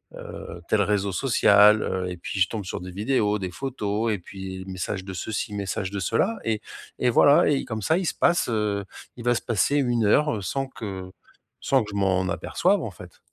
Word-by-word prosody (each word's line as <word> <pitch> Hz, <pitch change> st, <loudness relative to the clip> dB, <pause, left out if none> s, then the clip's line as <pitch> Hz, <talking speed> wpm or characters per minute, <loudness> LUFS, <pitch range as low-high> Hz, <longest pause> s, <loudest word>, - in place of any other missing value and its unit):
heu, -, -, -9 dB
tel -, -, +3 dB
réseau 100 Hz, -1 st, +1 dB
social», 105 Hz, -2 st, +5 dB
heu 95 Hz, -1 st, -2 dB
et 90 Hz, -, -5 dB
puis 95 Hz, -, -5 dB
je 90 Hz, -, +4 dB
tombe 110 Hz, -3 st, -5 dB
sur -, -, -4 dB
des 90 Hz, 0 st, -7 dB
vidéos, 105 Hz, +1 st, +1 dB
des 90 Hz, -2 st, -4 dB
photos 110 Hz, -3 st, -2 dB
et 100 Hz, -, -3 dB
puis 95 Hz, 0 st, -8 dB
message 95 Hz, +1 st, -4 dB
de 95 Hz, -1 st, -7 dB
ceci, 105 Hz, +2 st, -4 dB
message 100 Hz, -1 st, -3 dB
de 100 Hz, -, -3 dB
cela 225 Hz, -, 0 dB
et 110 Hz, -2 st, 0 dB, 0.4 s
et 125 Hz, -, +2 dB
voilà 140 Hz, +5 st, +5 dB
et 140 Hz, -, +1 dB
comme 110 Hz, -2 st, -4 dB
ça, 160 Hz, -, +2 dB
il 185 Hz, -, -1 dB
se -, -, 0 dB
passe, 175 Hz, -5 st, +2 dB
heu, 105 Hz, -3 st, -1 dB, 0.3 s
il 120 Hz, -, -9 dB
va 120 Hz, 0 st, +3 dB
se -, -, -1 dB
passer 120 Hz, +5 st, +1 dB
1 120 Hz, -5 st, +2 dB
heure 145 Hz, 0 st, +3 dB
sans 135 Hz, +7 st, -2 dB
que 95 Hz, -7 st, -7 dB, 0.5 s
sans 135 Hz, -4 st, +2 dB
que 105 Hz, -, -9 dB
je -, -, -7 dB
m'en 95 Hz, -1 st, +1 dB
aperçoive, 190 Hz, -, +1 dB
en 110 Hz, -, -4 dB
fait. 90 Hz, 0 st, -14 dB
105 Hz, 210 wpm, -25 LUFS, 95-120 Hz, 0.5 s, social